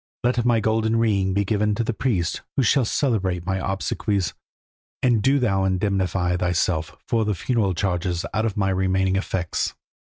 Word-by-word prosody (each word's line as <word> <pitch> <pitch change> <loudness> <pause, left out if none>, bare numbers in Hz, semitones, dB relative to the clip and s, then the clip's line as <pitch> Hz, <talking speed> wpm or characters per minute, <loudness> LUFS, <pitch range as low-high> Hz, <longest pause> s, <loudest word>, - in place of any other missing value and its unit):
Let 120 0 +2
my 120 -2 +4
golden 110 +1 +1
ring 100 -5 +1
be 100 0 +1
given 105 +1 +1
to 115 - 0
the 115 - -1
priests 105 -8 -1 0.2
who 135 - +4
shall 125 +2 +3
celebrate 95 -9 0
my 95 0 0
obsequies, 95 0 -1 0.7
and 120 -4 +3
do 135 +6 +3
thou 100 -7 +1
indemnify 95 -2 0
thyself 85 -2 -1
for 115 -1 +1
the 105 -1 0
funeral 100 -1 0
charges 90 -2 -1
out 110 +1 +1
of 105 - -4
my 95 -1 +1
remaining 95 0 +1
effects. 95 -3 -2
100 Hz, 165 wpm, -23 LUFS, 95-110 Hz, 0.7 s, my